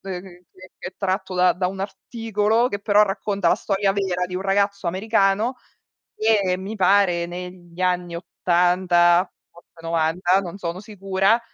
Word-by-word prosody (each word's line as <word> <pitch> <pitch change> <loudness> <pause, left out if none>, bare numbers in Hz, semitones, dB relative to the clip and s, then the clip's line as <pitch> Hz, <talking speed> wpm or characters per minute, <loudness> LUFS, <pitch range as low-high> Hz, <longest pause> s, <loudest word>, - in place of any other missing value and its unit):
c 180 -2 -5 0.6
che - - -8
è 185 - -16
tratto 190 -1 -2
da 180 0 +4
da 180 +2 -2
un 190 +1 -5
articolo, 220 +2 -1
che 200 - -4
però 205 0 +4
racconta 195 -2 -1
la - - +4
storia 195 0 0
vera 190 -2 -1
di 180 - -8
un 180 - -2
ragazzo 200 0 0
americano 200 +5 +1 0.6
che 205 -4 +2
mi 195 +3 -6
pare 185 -3 +3
negli 175 0 -9
anni 180 -1 -1
'80, 175 0 +2 0.2
forse 170 - -20
'90, 165 +3 +1
non 185 -1 -7
sono 175 -1 -4
sicura, 195 +1 0
190 Hz, 150 wpm, -22 LUFS, 180-200 Hz, 0.6 s, da